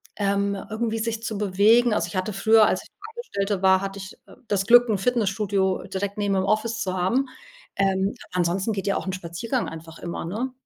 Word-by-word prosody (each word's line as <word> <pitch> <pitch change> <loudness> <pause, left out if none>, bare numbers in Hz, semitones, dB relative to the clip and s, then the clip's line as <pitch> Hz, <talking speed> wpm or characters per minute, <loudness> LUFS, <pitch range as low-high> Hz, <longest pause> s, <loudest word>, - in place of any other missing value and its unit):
ähm, 200 0 0
irgendwie 225 +1 -2
sich 225 0 -2
zu 220 -2 -3
bewegen. 210 +4 +4
Also, 170 -4 0
ich 175 - -9
hatte 185 +2 -2
früher 220 +2 +5
als - - +1
ich - - -18
noch - - -56
Angestellte 200 - -3
war, 190 0 +5
hatte 195 0 -5
ich, 190 +2 -8
äh, - - -16
das 195 -2 0
Glück, 240 +2 +6
'n 210 - +2
Fitnessstudio 200 -4 0
direkt 200 +1 -4
neben 205 -1 0
dem 190 - +1
Office 220 +2 0
zu 185 -2 -2
haben. 235 +10 +1 0.5
Ähm, 195 +1 +1 0.2
ansonsten 180 +4 0
geht 195 -1 -4
ja 200 - +1
auch - - -5
'n 190 - -3
Spaziergang 185 +8 -3
einfach 160 0 -10
immer, 170 -1 -5
ne? 225 +10 -3
200 Hz, 210 wpm, -24 LUFS, 190-220 Hz, 0.5 s, Glück